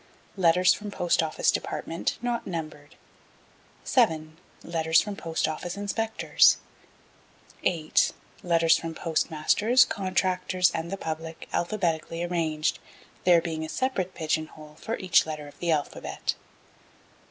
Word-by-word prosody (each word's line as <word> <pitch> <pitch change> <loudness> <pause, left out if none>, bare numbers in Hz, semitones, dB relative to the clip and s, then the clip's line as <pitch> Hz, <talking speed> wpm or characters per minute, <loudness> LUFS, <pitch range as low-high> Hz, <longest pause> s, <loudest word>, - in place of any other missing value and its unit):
Letters 180 0 +4
from 210 0 -6
Post 175 -4 +1
Office 160 -1 +1
Department 165 - -3
not 240 -1 -2
numbered. 155 -4 -6 0.9
7. 160 -11 +1 0.3
do. 165 +4 +1
Post 165 -4 -1
Office 170 +4 -4
Inspectors. 220 +2 +3 1.1
8. 160 -3 +2 0.3
do. 165 -1 +2
Postmasters, 170 +10 +2
Contractors 185 -2 +1
and 165 0 -4
the 195 - -4
Public 160 -1 -6
alphabetically 170 -3 -1
arranged, 160 -3 -1 0.5
there 175 -2 +6
being 160 -2 -3
a 160 - -5
separate 195 -8 -2
pigeon 155 -1 -1
hole 155 -1 -14
for 225 - -3
each 180 -3 +3
letter 155 -2 -5
of 145 - -15
the 175 - -2
alphabet. 150 -3 -1
170 Hz, 115 wpm, -27 LUFS, 160-185 Hz, 1.1 s, there